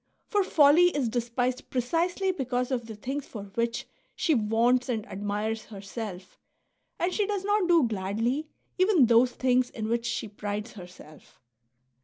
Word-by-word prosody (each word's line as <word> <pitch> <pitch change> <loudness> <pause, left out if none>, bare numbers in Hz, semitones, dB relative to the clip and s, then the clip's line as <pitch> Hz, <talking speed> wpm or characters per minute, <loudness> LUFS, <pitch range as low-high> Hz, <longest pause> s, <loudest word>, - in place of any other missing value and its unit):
For 410 -2 +1
folly 310 -1 +5
is 265 -5 0
despised 245 +2 -2
precisely 340 +9 0
because 250 -6 -2
of 240 -3 -2
the 220 - -7
things 270 +6 -5
for 210 -4 -7
which 235 +1 -1 0.3
she 360 -3 +1
vaunts 235 +2 +2
and 220 -4 -1
admires 210 +2 -3
herself, 195 -2 -8 0.6
and 355 +2 0
she 415 -2 +1
does 405 -2 -2
not 410 -2 +2
do 340 -3 +5
gladly 225 +8 -1 0.3
even 370 - +5
those 235 +2 +4
things 255 -1 +2
in 220 -1 -5
which 235 0 0
she - - -2
prides 205 +2 -5
herself. 180 -5 -14
245 Hz, 150 wpm, -27 LUFS, 215-295 Hz, 0.6 s, folly